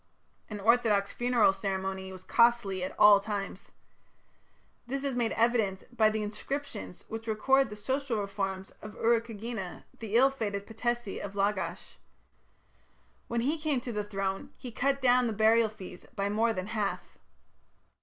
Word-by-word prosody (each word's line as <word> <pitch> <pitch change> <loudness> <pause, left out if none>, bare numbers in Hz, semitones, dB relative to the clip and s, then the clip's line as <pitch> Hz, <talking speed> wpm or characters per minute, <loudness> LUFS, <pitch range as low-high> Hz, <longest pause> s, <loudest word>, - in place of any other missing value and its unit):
An 210 -2 -5
orthodox 210 -2 +3
funeral 240 -5 +3
ceremony 190 -1 -3
was 185 -1 -10
costly 235 -6 +3
at 185 - -5
all 205 -1 +8
times. 200 -2 -5 1.2
This 275 +2 -3
is 275 -1 -1
made 240 -2 0
evident 225 -2 0
by 220 -2 +5
the 215 0 -2
inscriptions 215 -1 -5
which 225 +1 -6
record 265 +4 +3
the 210 - -7
social 260 +3 -2
reforms 195 -1 -3
of 215 0 -9
Urukagina, 225 -4 -1 0.2
the 225 -1 -4
ill 265 +3 +6
fated 205 -6 -3
patesi 240 -1 -3
of 200 0 -7
Lagash. 200 0 -2 1.3
When 235 0 -1
he 295 +6 0
came 300 -4 0
to 245 - -5
the 210 -2 -2
throne 195 +4 -3
he 250 - -8
cut 275 +4 0
down 250 -1 +4
the 225 - -1
burial 220 +1 +4
fees 190 -4 -11
by 200 0 -1
more 225 +3 +2
than 185 -4 -3
a - - -9
half. 210 -3 -3
220 Hz, 155 wpm, -30 LUFS, 200-240 Hz, 1.3 s, all